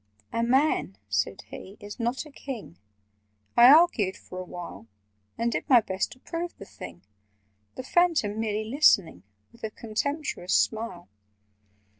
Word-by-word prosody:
'" 105 0 -32
"A 230 - 0
man," 255 - +2
said 100 -1 -1
he, 195 +2 -10
"is 205 +3 -9
not 240 +6 -1
a 300 - -13
King." 235 - -8 0.8
I 240 +2 +9
argued 280 - +5
for 185 - -9
a - - -4
while, 175 -9 -9 0.5
And 235 +1 0
did - - -3
my 250 -3 +8
best 190 -3 -2
to 255 - -21
prove 340 +4 -5
the 200 - -10
thing— 85 - -11 0.7
The 255 - -6
Phantom 300 -10 +2
merely 215 -1 -1
listening 200 - +3 0.3
With 235 - -21
a 220 - -2
contemptuous 230 - -2
smile. 215 -6 0
225 Hz, 150 wpm, -27 LUFS, 185-265 Hz, 0.8 s, I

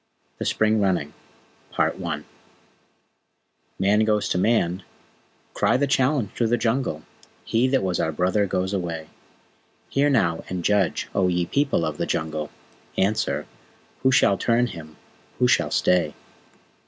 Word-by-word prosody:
THE - - -3
SPRING 110 0 +2
RUNNING 90 -7 0 2.6
Man 100 +2 +3
goes 105 -1 +1
to 90 - 0
Man! 95 -3 +1 0.7
Cry - - +2
the 140 - +2
challenge 130 -3 +1
through 115 - 0
the 120 +2 +2
Jungle! 115 - -1 0.4
He 115 +3 +2
that 130 -5 +1
was 90 -2 -1
our 80 - 0
Brother 95 +5 +1
goes 95 +1 -1
away. 85 -4 -4 0.8
Hear, 140 +1 +2
now, 85 - +1
and 90 -2 -4
judge, 100 -4 +1
O 95 -2 +2
ye 90 -1 +1
People 140 - +1
of 75 -2 -3
the - - -2
Jungle, 80 -1 -2 0.5
Answer, 105 +3 0 0.6
who 130 - +3
shall 100 -6 +4
turn 120 +1 +2
him 80 -8 -9 0.4
who 125 - +3
shall - - +2
stay? 85 -5 +1
100 Hz, 135 wpm, -24 LUFS, 85-120 Hz, 2.6 s, shall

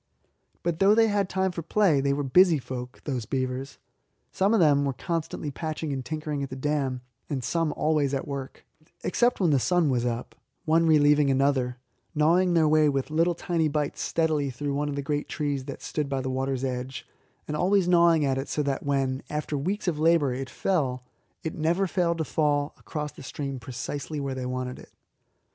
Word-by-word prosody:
But 170 -1 -1
though 200 +2 +5
they 225 0 +4
had 200 -2 0
time 190 0 0
for 170 - -5
play, 170 -3 +2
they 140 0 +1
were 145 +1 0
busy 170 +5 +5
folk, 125 -2 -7
the 130 -5 -2
beavers. 130 0 -3 0.5
Some 195 +2 +2
of 225 - +4
them 145 -4 +4
were 140 -1 0
constantly 155 +1 -3
patching 155 0 -4
and 135 -1 -3
tinkering 150 +1 -3
at 135 - -3
the 130 - -6
dam, 135 -2 -1 0.3
and 135 -4 -2
some 165 +1 0
always 150 -3 +1
at 135 - -3
work, 140 -2 -6 0.4
except 240 +6 +2
when 175 -5 +3
the 140 - +4
sun 175 +1 +2
was 120 -2 +1
up, 120 0 -3 0.3
one 165 +1 +3
relieving 150 -2 +5
another, 135 -2 +1 0.4
gnawing 175 +4 +3
their 160 -2 +4
way 155 0 +4
with 135 +1 -2
little 165 +2 +2
tiny 165 -2 0
bites 150 -1 -2
steadily 155 -4 0
through 140 +3 -3
one 145 +1 -1
of 140 - -3
the 140 - -3
great 145 +1 -2
trees 145 -3 -2
that 140 - -8
stood 150 -2 -2
by 135 -1 -1
the 130 0 -3
water's 130 0 -2
edge, 130 0 -4 0.4
and 150 - -3
always 190 +2 +2
gnawing 170 -3 +5
it 135 0 -1
so 150 - 0
that 140 -1 -1
when, 135 -1 0
after 150 0 -3
weeks 185 +9 -2
of 160 -4 0
labour, 160 -4 +3
it 130 +1 -5
fell, 130 -6 -1 0.4
it 160 - -3
never 170 +5 +1
failed 175 -2 0
to 160 - 0
fall 145 -2 0
across 150 -1 -5
the - - -13
stream 135 0 -5
precisely 130 +5 -5
where 140 -1 -3
they 130 -1 -4
wanted 125 0 -4
it. - - -14
145 Hz, 195 wpm, -26 LUFS, 135-165 Hz, 0.5 s, though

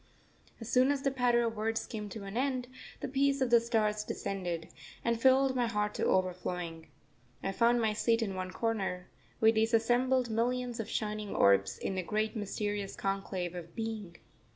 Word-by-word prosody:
As 225 - -7
soon 255 +2 +4
as 280 -1 0
the 275 - +2
patter 245 -2 +3
of 225 -1 -2
words 220 +1 -1
came 210 -2 -6
to 210 +1 -7
an 195 +1 -7
end, 255 -1 0 0.3
the - - -2
peace 275 +1 +2
of 260 -2 0
the 235 - +8
stars 215 -3 0
descended, 175 -6 -4 0.4
and 235 -1 +1
filled 265 +1 +5
my 245 -2 +2
heart 210 -2 -1
to - - -1
overflowing. 180 -3 -1 0.6
I 195 - 0
found 235 +4 +3
my 220 -1 +2
seat 230 +2 +2
in 200 -3 -3
one 185 0 -4
corner, 190 -3 -2 0.3
with 220 0 +5
these 225 +1 +3
assembled 245 +2 +2
millions 245 +1 -1
of 220 -1 -4
shining 210 -1 -3
orbs, 100 0 +4
in - - -3
the 190 - -1
great 215 +5 -1
mysterious 205 -1 -3
conclave 195 -2 -2
of 170 -2 -8
Being. 220 -6 -4
220 Hz, 180 wpm, -32 LUFS, 195-240 Hz, 0.6 s, the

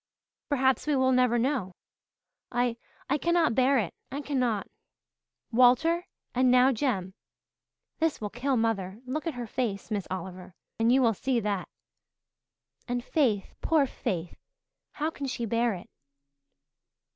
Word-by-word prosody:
Perhaps 265 -1 +2
we 300 - +2
will 260 -1 +3
never 250 -2 +3
know. 235 -7 -1 0.8
I 245 -1 0 0.3
I 285 +2 +1
cannot 340 -5 +2
bear 265 +3 +4
it 205 -8 -1 0.2
I 280 - -3
cannot. 250 -8 0 0.9
Walter 255 +9 +4 0.3
and 255 0 +3
now 250 +1 +6
Jem. 215 -7 -1 0.9
This 325 -2 +1
will 210 -1 -4
kill 260 +2 0
mother 210 -3 -1
look 300 +6 -3
at 320 - -2
her 245 -1 -4
face, 220 -3 -3
Miss 205 -3 -2
Oliver, 185 0 -6 0.2
and 225 +1 +4
you 260 +1 +5
will 230 -2 +4
see 250 +4 0
that. 200 -3 -2 1.2
And 245 -1 -2
Faith 240 -10 +1
poor 315 -4 +3
Faith 175 -9 -4 0.5
how 310 +2 -1
can 280 -3 -5
she 240 -2 -3
bear 230 0 +1
it?" 185 +5 -10
245 Hz, 140 wpm, -28 LUFS, 215-270 Hz, 1.2 s, now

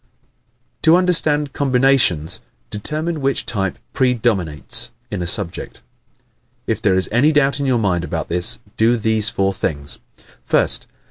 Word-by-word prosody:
_ - - -48
To 160 - +5
Understand 155 -6 +2
Combinations 125 - +2 0.3
Determine 155 +9 -2
which 135 0 -1
type 95 -4 -2 0.2
PREDOMINATES 110 - 0 0.2
in - - -4
a 85 - -3
subject. 85 0 -1 0.8
If - - -2
there 95 - +2
is 95 - +2
any 130 +8 +3
doubt 145 -2 +1
in 140 - -2
your 130 -2 +2
mind 95 -6 0
about - - -4
this 90 0 +2 0.2
do 115 +2 +2
these 110 -1 +2
four 95 0 -1
things: 70 -6 -4 0.5
1st. - - +2
115 Hz, 140 wpm, -18 LUFS, 95-140 Hz, 0.8 s, To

